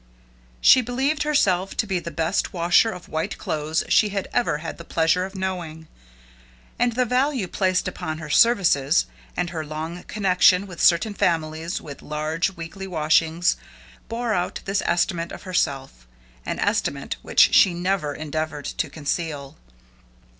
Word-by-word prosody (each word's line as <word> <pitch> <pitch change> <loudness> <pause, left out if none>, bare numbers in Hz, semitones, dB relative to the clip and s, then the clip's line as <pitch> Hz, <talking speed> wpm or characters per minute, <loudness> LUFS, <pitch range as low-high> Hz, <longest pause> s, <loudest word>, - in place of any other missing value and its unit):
She 260 - +7
believed 265 +5 -1
herself 195 -12 +1
to 225 - +1
be 190 -3 -1
the 170 - -6
best 165 +5 -1
washer 175 +5 +4
of 180 -4 -8
white 160 +1 -3
clothes 155 +1 -2
she 210 - +4
had 200 -1 -3
ever 240 -11 +1
had 165 +2 -7
the - - -8
pleasure 165 +2 +1
of 195 +1 -10
knowing, 175 -4 -4 0.9
and 245 -1 +2
the 250 +2 +1
value 255 -3 0
placed 185 +1 0
upon 160 -3 -4
her 155 -1 -7
services, 170 - +4 0.3
and 175 -1 -1
her 160 -3 -4
long 160 +3 -6
connection 190 -1 +3
with 180 -3 -8
certain 180 +5 +4
families 165 -2 -1
with 140 -2 -10
large 155 +4 -1
weekly 170 +4 -7
washings, 160 0 +2 0.5
bore 230 0 -1
out 180 -2 -2
this 195 +1 0
estimate 170 -1 0
of - - -9
herself 135 - -2 0.4
an - - -2
estimate - - -1
which - - +4
she 180 -3 +6
never 175 -4 -1
endeavored 155 -1 -4
to - - -3
conceal. 150 -2 -4
175 Hz, 150 wpm, -23 LUFS, 155-195 Hz, 0.9 s, She